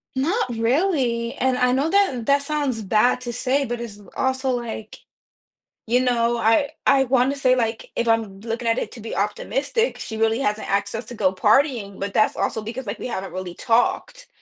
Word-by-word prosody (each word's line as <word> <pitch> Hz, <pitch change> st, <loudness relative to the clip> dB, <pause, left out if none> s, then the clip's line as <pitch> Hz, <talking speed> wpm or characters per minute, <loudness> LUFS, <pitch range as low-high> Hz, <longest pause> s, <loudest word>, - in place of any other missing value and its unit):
Not 335 Hz, -, 0 dB
really, 240 Hz, -1 st, 0 dB
and 260 Hz, 0 st, +1 dB
I 250 Hz, 0 st, +2 dB
know 275 Hz, +4 st, +1 dB
that 325 Hz, -, +2 dB
that 280 Hz, 0 st, +3 dB
sounds 280 Hz, -6 st, -1 dB
bad 220 Hz, +5 st, +2 dB
to 240 Hz, -1 st, -4 dB
say, 260 Hz, +4 st, 0 dB
but 240 Hz, -1 st, -4 dB
it's 220 Hz, -4 st, -7 dB
l 205 Hz, -, -16 dB
also 260 Hz, 0 st, 0 dB
like, 235 Hz, -3 st, -4 dB, 0.9 s
you 240 Hz, +2 st, +2 dB
know, 240 Hz, -2 st, +1 dB
I 230 Hz, +5 st, +3 dB, 0.2 s
I 270 Hz, -1 st, +5 dB
wanna 260 Hz, +2 st, +2 dB
say, 255 Hz, -2 st, +3 dB
like, 225 Hz, -2 st, -2 dB
if 235 Hz, -, 0 dB
I'm 225 Hz, -4 st, 0 dB
looking 230 Hz, +2 st, -4 dB
at 230 Hz, -, +2 dB
it -, -, -3 dB
to 230 Hz, -, -10 dB
be 225 Hz, -, -6 dB
optimistic, 275 Hz, -, -1 dB
she 220 Hz, -, -5 dB
really 225 Hz, +1 st, +1 dB
hasn't 215 Hz, -5 st, -1 dB
access 200 Hz, +3 st, -1 dB
to -, -, -7 dB
go 190 Hz, -3 st, +1 dB
partying, 215 Hz, -1 st, +2 dB
but 200 Hz, 0 st, -4 dB
that's 215 Hz, -, +2 dB
also 220 Hz, -, -1 dB
because, 230 Hz, +3 st, -6 dB
like, 205 Hz, -, -4 dB
we -, -, -4 dB
haven't 195 Hz, -5 st, -5 dB
really 185 Hz, -1 st, -5 dB
talked, 245 Hz, -, 0 dB
240 Hz, 195 wpm, -22 LUFS, 220-265 Hz, 0.9 s, I